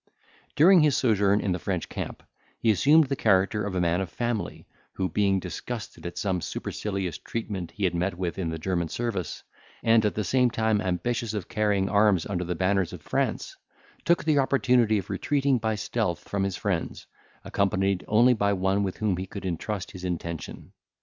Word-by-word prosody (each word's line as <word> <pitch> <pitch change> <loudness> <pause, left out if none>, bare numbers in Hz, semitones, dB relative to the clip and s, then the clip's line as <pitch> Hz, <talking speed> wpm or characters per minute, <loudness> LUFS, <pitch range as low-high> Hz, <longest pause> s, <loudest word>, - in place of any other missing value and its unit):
During 180 +5 +7
his 150 -3 +3
sojourn 105 -4 +3
in 100 - -1
the 90 - -1
French 90 0 -2
camp, - - -6 0.3
he 115 - +3
assumed 150 +9 +5
the 135 -1 -2
character 100 -1 +2
of 95 - -4
a - - +1
man 85 +1 +1
of 95 - -4
family, 120 +3 -3 0.3
who 95 - -1
being 95 +2 +1
disgusted 105 +2 -6
at 85 0 -8
some 95 -1 -1
supercilious 95 -4 -4
treatment 100 -6 -5
he 105 - -6
had 90 -2 +2
met 90 +1 -1
with 90 0 -3
in 85 -3 -1
the 80 - -3
German 85 +1 -1
service, 100 -3 -3 0.4
and 115 -1 +4
at 105 - 0
the 105 - -1
same 125 +5 +3
time 110 -2 +1
ambitious 110 +5 -2
of 100 -4 -4
carrying 105 -4 +1
arms 100 -4 +3
under 90 -3 -2
the 90 0 -3
banners 95 0 +1
of - - -9
France, - - -2 0.5
took 170 0 +2
the 155 -2 +3
opportunity 125 -5 +3
of 95 -2 -5
retreating 140 -3 +1
by 110 -1 -1
stealth 105 -5 -2
from 100 - -2
his 95 -2 -2
friends, 95 -5 -3 0.4
accompanied 95 -1 0
only 120 +4 +5
by 100 -3 +1
one 95 +1 +1
with 95 -2 -2
whom 105 -4 0
he 95 +1 -4
could 100 0 -8
intrust 95 +3 -3
his 95 - -10
intention. 85 -2 -5
100 Hz, 190 wpm, -26 LUFS, 90-115 Hz, 0.5 s, During